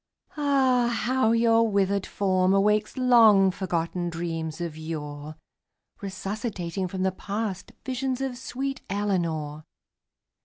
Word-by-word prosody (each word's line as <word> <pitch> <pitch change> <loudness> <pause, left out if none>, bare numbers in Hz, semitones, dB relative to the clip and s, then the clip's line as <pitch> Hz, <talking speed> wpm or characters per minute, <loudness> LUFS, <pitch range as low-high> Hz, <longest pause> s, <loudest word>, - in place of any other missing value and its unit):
Ah, 265 -5 +2
how 255 -1 +2
your 230 0 +4
withered 200 -1 +1
form 185 -1 +2
awakes 210 +4 +2
Long 225 -7 +6
forgotten 175 -2 -2
dreams 165 -1 -4
of 170 -3 -4
yore 155 -1 -6 0.7
Resuscitating 195 -2 -4
from 185 +1 -3
the 190 - +2
past 200 0 -4
Visions 260 0 -2
of 270 -2 -2
sweet 270 +2 -4
Eleanor! 170 -7 -2
195 Hz, 110 wpm, -26 LUFS, 175-235 Hz, 0.7 s, Long